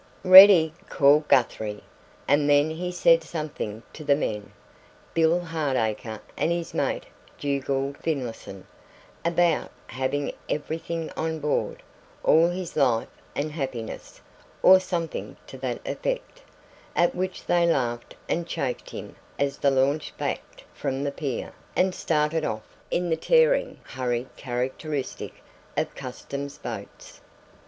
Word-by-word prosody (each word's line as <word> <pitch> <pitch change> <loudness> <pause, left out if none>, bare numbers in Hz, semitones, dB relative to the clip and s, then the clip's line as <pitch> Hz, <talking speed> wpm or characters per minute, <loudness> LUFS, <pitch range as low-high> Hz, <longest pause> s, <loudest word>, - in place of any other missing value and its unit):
"Ready!" 185 -4 +10 0.2
called 150 +2 +4
Guthrie. 110 -4 +1 0.4
And 145 0 +3
then 145 +2 +4
he 180 +3 -3
said 170 -2 +4
something 150 -10 -5
to 155 - -9
the 145 -1 +4
men, 105 -8 -3 0.6
Bill 165 +1 +3
Hardacre 130 -10 -2
and 165 - 0
his 170 -1 -2
mate - - -1 0.3
Dugald 140 0 -1
Finlayson, 120 - -4 0.6
about 170 -1 +2 0.2
having 135 +2 -2 0.2
everything 160 +2 -3
on 160 0 -2
board 150 -1 -2 0.4
all 165 +2 +5
his 180 -1 -5
life 125 -6 +2 0.3
and 150 +2 -2
happiness, 130 -7 -6 0.4
or 190 0 +9
something 175 -3 -4
to - - -11
that - - -3
effect - - -3 0.5
at 175 - +3
which 185 +1 -4
they 175 -1 +3
laughed 120 -7 -1
and 170 0 -1
chaffed 130 -6 -3
him - - -8 0.2
as 140 0 -1
the 140 - +4
launch 140 +3 +1
backed - - -4
from 135 +1 -3
the 140 - -1
pier, 140 -3 -4 0.2
and 185 0 +2
started 155 -1 0
off 110 -4 -4
in 175 -1 0
the - - +4
tearing - - +3
hurry 125 -1 -2
characteristic 130 +3 -4 0.3
of - - -1
Customs 140 +2 -6
boats. - - -8
150 Hz, 125 wpm, -26 LUFS, 130-170 Hz, 0.6 s, Ready